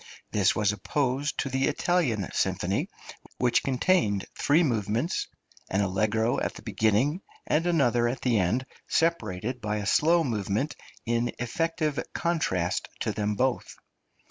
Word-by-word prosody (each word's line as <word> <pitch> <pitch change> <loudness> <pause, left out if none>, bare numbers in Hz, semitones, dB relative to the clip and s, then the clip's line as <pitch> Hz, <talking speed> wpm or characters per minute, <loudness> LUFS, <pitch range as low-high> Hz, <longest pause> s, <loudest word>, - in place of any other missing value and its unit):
This 100 -3 +3
was 105 -2 +2
opposed 135 +7 -1
to 135 - -3
the 135 +1 +1
Italian 145 - +1
symphony, - - 0 0.5
which 120 -1 +3
contained 130 - +1
three 155 +5 +3
movements: 115 - 0 0.4
an 95 - +1
allegro 110 +4 +1
at - - -2
the - - -11
beginning 120 - +1 0.2
and 165 +3 +1
another 125 -8 +3
at 120 +3 -3
the 120 -4 +2
end, 105 +9 +1 0.2
separated 125 - 0
by 105 0 -1
a 105 -1 -3
slow 165 - +4
movement 110 +3 -1 0.3
in 120 +1 0
effective 155 +4 -1 0.2
contrast 95 - 0
to - - 0
them 105 -1 -1
both. 130 +3 -1
120 Hz, 135 wpm, -27 LUFS, 105-150 Hz, 0.5 s, slow